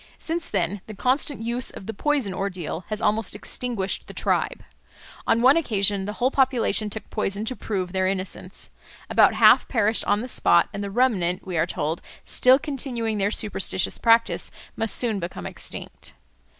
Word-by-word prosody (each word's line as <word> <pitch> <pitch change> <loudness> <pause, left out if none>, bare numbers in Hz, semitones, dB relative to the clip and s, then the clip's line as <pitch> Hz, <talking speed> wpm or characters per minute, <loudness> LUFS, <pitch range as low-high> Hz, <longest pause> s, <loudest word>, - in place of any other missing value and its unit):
Since 335 +1 -2
then 190 0 -1
the 215 - -8
constant 255 +3 0
use 235 +2 -1
of - - -10
the 225 - -5
poison 275 -4 0
ordeal 180 -3 -4
has 215 -1 -4
almost 210 -1 +1
extinguished 210 -2 -3
the - - -11
tribe. - - -1 0.6
On 230 +1 +2
one 270 +5 +6
occasion 200 - +1
the 210 - -4
whole 250 +4 0
population 255 -5 +2
took 215 +1 -6
poison 210 -1 -2
to 255 - -2
prove 185 -6 -3
their 190 0 0
innocence. 190 0 -4 0.4
About - - +5
half - - +6
perished 220 -2 +2
on 205 +1 +2
the 250 - -5
spot, 170 -8 +3
and 200 - -4
the 200 - -4
remnant, 195 -6 +1
we 185 -2 -5
are 165 +1 +1
told, 160 0 -2 0.2
still 255 +1 +5
continuing 245 -7 -3
their 200 +1 +2
superstitious 205 -3 0
practice, 230 0 +3 0.3
must 225 -2 +1
soon 225 -5 0
become 175 0 -6
extinct. - - -6
215 Hz, 170 wpm, -24 LUFS, 195-245 Hz, 0.6 s, one